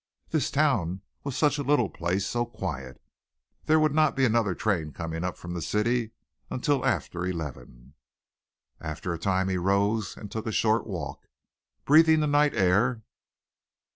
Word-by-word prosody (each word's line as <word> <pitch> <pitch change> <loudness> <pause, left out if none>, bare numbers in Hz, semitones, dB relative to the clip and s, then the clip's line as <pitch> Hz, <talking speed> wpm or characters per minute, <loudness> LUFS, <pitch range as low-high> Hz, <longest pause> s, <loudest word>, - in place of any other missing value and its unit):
This 155 -3 0
town 105 - +1 0.2
was 140 -2 -4
such 145 0 +2
a - - -1
little 140 -5 +3
place 90 +3 -2
so 120 0 0
quiet. 70 - -6 0.7
There 155 +1 +4
would 155 -2 +2
not 155 -1 +3
be 135 -1 +3
another 110 -5 +2
train 85 -8 -1
coming 80 +3 -4
up 90 -1 -3
from 85 0 -7
the 85 - -4
city 115 +5 0 0.4
until 135 +1 0
after 90 0 -1
eleven. 75 -7 -6 0.9
After 80 +2 -4
a 85 - -5
time 95 +1 +1
he 95 -1 0
rose 100 +3 +1
and 105 - -9
took 110 0 -4
a - - -1
short 110 +1 +1
walk, 95 -6 -6 0.6
breathing 160 +2 +6
the 155 - +1
night 145 0 +3
air. 110 +6 +2
105 Hz, 160 wpm, -27 LUFS, 90-135 Hz, 0.9 s, breathing